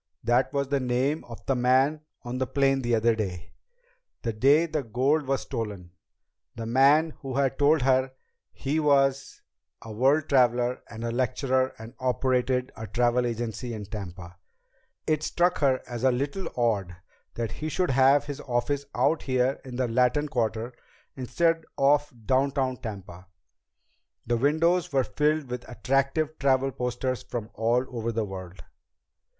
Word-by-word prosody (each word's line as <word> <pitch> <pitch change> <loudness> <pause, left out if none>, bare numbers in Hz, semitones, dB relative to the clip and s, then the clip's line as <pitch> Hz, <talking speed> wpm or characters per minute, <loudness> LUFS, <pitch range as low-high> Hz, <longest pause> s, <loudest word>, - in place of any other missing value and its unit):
That 120 +3 +2
was 140 -1 -1
the 140 0 +1
name 130 +4 0
of 115 -2 -11
the 135 - +1
man 130 +4 +2 0.2
on 120 +1 -4
the 130 - 0
plane 135 0 +2
the 120 -2 +1
other 115 +1 +3
day 95 -6 -5 0.7
the 115 -3 -1
day 140 +9 +4
the 155 -2 -2
gold 135 +5 0
was 135 -3 0
stolen 100 -6 -5 0.6
the 115 - -5
man 140 +7 +4
who 135 -2 -6
had 135 -1 0
told 145 0 +4
her 130 0 +2 0.4
he 145 +4 -2
was 140 -2 +1 0.4
a 115 - -10
world 135 +7 +2
traveler 125 -2 +2
and 115 0 -8
lecturer 130 +2 0
and 110 +2 -10
operated 130 0 0
a 110 0 -7
travel 120 +3 +1
agency 120 +1 -4
in 105 -1 -6
Tampa. 90 -4 -8 0.7
It 155 -1 +1
struck 175 +3 +1
her 135 -3 +2
as 120 -1 -6
a 130 - +5
little 140 +9 -2
odd 105 -7 0 0.4
that 115 -1 -3
he 155 - -5
should 180 0 0
have 135 +2 +5
his 145 0 -6
office 135 +3 -1
out 155 +3 +2
here 130 0 0
in 130 -2 -8
the 125 0 0
Latin 125 +5 +2
Quarter 115 -2 -2 0.4
instead 165 +5 0
of 145 +1 +3
downtown 130 +1 +1
Tampa. 95 -5 -8 1.0
The 120 +1 +1
windows 165 +7 +2
were 135 -2 +2
filled 150 -1 0
with 125 0 -6
attractive 140 +5 0
travel 135 -1 +2
posters 125 0 -2
from 115 -2 -6
all 120 +3 +1
over 115 0 -2
the 115 -1 -1
world. 95 -2 -9
130 Hz, 155 wpm, -26 LUFS, 115-140 Hz, 1.0 s, a